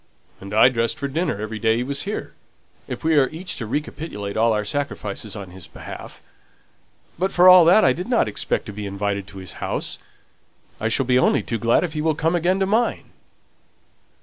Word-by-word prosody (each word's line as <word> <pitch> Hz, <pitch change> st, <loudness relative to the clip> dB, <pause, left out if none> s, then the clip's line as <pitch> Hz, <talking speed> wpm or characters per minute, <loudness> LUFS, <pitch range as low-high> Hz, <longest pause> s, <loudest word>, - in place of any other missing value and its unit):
"And 100 Hz, +1 st, -10 dB
I 110 Hz, +4 st, +6 dB
dressed 115 Hz, -2 st, -1 dB
for 140 Hz, -, -3 dB
dinner 155 Hz, -, -2 dB
every 110 Hz, +1 st, -5 dB
day 110 Hz, 0 st, +2 dB
he 120 Hz, -, -1 dB
was 140 Hz, +2 st, -3 dB
here, 215 Hz, -, -5 dB, 0.5 s
if -, -, -6 dB
we 160 Hz, -2 st, +4 dB
are 135 Hz, -, +2 dB
each 180 Hz, +4 st, -5 dB
to 115 Hz, -, -5 dB
recapitulate 125 Hz, -6 st, -4 dB
all 115 Hz, +1 st, +3 dB
our 105 Hz, -1 st, 0 dB
sacrifices 110 Hz, -5 st, -4 dB
on 100 Hz, -3 st, -8 dB
his 90 Hz, -2 st, -11 dB
behalf. -, -, -10 dB, 1.0 s
But, 190 Hz, +2 st, 0 dB
for 180 Hz, 0 st, +5 dB
all 180 Hz, -2 st, +9 dB
that, 185 Hz, +6 st, +6 dB
I -, -, +5 dB
didn't 230 Hz, +7 st, 0 dB
expect -, -, -2 dB
to 105 Hz, -, -8 dB
be 105 Hz, 0 st, -5 dB
invited 100 Hz, 0 st, -3 dB
to 100 Hz, -, -12 dB
his 95 Hz, -2 st, -7 dB
house. -, -, -3 dB, 0.8 s
I 110 Hz, -, -1 dB
shall 130 Hz, +4 st, +1 dB
be 125 Hz, 0 st, +3 dB
only -, -, +2 dB
too 115 Hz, -, -3 dB
glad 115 Hz, -, +3 dB
if 170 Hz, -3 st, -3 dB
he 155 Hz, -, -2 dB
will 160 Hz, 0 st, +1 dB
come 165 Hz, +2 st, 0 dB
again 175 Hz, +3 st, +1 dB
to -, -, +3 dB
mine." 220 Hz, +5 st, 0 dB
125 Hz, 205 wpm, -22 LUFS, 105-165 Hz, 1.0 s, all